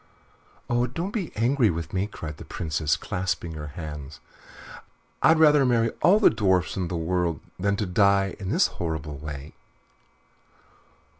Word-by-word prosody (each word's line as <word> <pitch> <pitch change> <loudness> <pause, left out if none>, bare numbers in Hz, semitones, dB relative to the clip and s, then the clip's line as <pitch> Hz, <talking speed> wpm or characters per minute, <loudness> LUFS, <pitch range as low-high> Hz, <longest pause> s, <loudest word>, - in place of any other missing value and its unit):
"Oh, 120 +1 +1
don't 170 - -4
be 195 -8 -3
angry 120 +1 +3
with 85 -1 -4
me," 95 +2 0
cried 80 -7 -8
the - - -9
Princess, 75 -1 -1
clasping 90 -2 -3
her 75 -2 -6
hands. 75 -2 -7 1.0
"I'd 160 - +5
rather 150 -3 +6
marry 115 -3 +2
all 195 +5 +5
the 215 - +6
dwarfs 95 -6 +1
in 95 -2 -2
the 85 - -3
world 85 0 -1 0.2
than 100 +2 +1
die 100 -1 +2
in 95 -2 -5
this - - +3
horrible 80 -4 -4
way." 75 0 -7
90 Hz, 145 wpm, -25 LUFS, 80-115 Hz, 1.0 s, rather